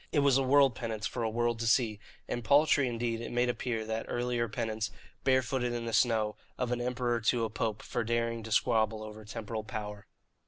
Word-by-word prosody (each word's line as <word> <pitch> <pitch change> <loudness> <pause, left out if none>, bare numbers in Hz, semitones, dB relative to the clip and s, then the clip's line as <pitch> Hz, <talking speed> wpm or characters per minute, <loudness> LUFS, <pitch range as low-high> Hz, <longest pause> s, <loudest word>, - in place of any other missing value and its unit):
It 145 - +3
was 140 -2 +4
a 135 - +4
world 135 0 +5
penance 115 -2 -4
for 120 - -3
a 115 - +1
world 120 +1 0
to 115 - -1
see, 115 -3 +2 0.3
and 120 - -3
paltry 140 +2 +4
indeed 115 -1 -2
it - - -5
made 120 +1 +2
appear 120 -2 -2
that 110 +1 -3
earlier 120 -1 -1
penance, 110 0 -2 0.3
barefooted 130 -1 +1
in 120 -1 -3
the 115 - -3
snow, 110 -3 +2 0.2
of 125 -1 -1
an 120 0 0
emperor 120 -1 0
to 115 +1 +2
a 110 - -5
pope 110 -2 -2
for - - -2
daring 115 0 0
to 110 0 -8
squabble 110 -1 +2
over 110 0 -9
temporal 110 0 -5
power. 105 -2 -6
115 Hz, 205 wpm, -31 LUFS, 110-125 Hz, 0.3 s, world